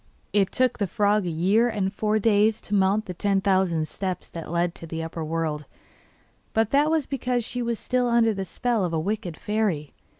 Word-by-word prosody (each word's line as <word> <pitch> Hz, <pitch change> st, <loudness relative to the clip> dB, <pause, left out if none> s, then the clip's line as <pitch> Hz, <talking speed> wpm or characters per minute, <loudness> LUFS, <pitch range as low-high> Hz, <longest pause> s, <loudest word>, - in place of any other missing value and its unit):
It 200 Hz, -2 st, +2 dB
took 255 Hz, -1 st, +1 dB
the 200 Hz, -, +1 dB
frog 205 Hz, +1 st, +1 dB
a -, -, 0 dB
year 195 Hz, +9 st, +2 dB
and 200 Hz, -3 st, -1 dB
four 215 Hz, +1 st, +1 dB
days 215 Hz, 0 st, +3 dB
to 210 Hz, -, -7 dB
mount 200 Hz, +2 st, +2 dB
the 180 Hz, -, -5 dB
ten 195 Hz, +2 st, +1 dB
thousand 185 Hz, -5 st, +1 dB
steps 185 Hz, 0 st, -4 dB
that 165 Hz, -1 st, -7 dB
led 170 Hz, +1 st, 0 dB
to 165 Hz, -, -10 dB
the 160 Hz, 0 st, -4 dB
upper 165 Hz, 0 st, -5 dB
world, 155 Hz, -2 st, -2 dB, 0.9 s
but 220 Hz, -1 st, +1 dB
that 290 Hz, +2 st, +4 dB
was 315 Hz, -3 st, +1 dB
because 250 Hz, -3 st, -1 dB
she 245 Hz, -, -3 dB
was 235 Hz, -1 st, -1 dB
still 250 Hz, +2 st, 0 dB
under 235 Hz, -2 st, +3 dB
the 195 Hz, -1 st, -3 dB
spell 235 Hz, +2 st, -1 dB
of 175 Hz, -2 st, -2 dB
a 160 Hz, -, +1 dB
wicked 195 Hz, -1 st, -3 dB
fairy. 205 Hz, -9 st, -1 dB
205 Hz, 205 wpm, -25 LUFS, 175-225 Hz, 0.9 s, that